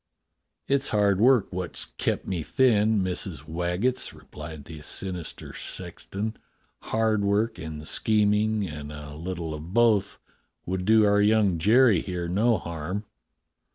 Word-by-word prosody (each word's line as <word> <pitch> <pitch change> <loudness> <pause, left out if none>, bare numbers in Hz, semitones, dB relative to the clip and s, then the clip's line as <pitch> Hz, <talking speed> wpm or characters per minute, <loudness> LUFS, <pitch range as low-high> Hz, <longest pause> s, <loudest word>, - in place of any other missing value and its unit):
"It's 140 0 +2
hard 100 -2 +2
work 120 -5 +4
wot's 90 -1 -3
kept - - -2
me 90 -3 -2
thin, 110 - +3
Missus 90 -6 -3
Wag 85 +3 -2
getts," 130 0 0
replied 75 -1 -10
the 80 -1 -9
sinister 90 +1 -5
sexton; 110 +3 -5 0.4
"hard 110 -2 0
work 105 +1 +1
and 80 -2 -7
scheming; 105 -1 +2
and 75 -2 -7
a 75 0 -8
little 85 0 -5
of 80 +5 -8
both 115 -4 +3 0.5
would 90 0 -2
do 110 +1 +5
our 100 0 +4
young 105 -5 +3
Jerry 110 +1 +5
here 90 -2 -4
no 110 +6 +2
harm." 85 +5 -5
95 Hz, 135 wpm, -26 LUFS, 85-110 Hz, 0.5 s, do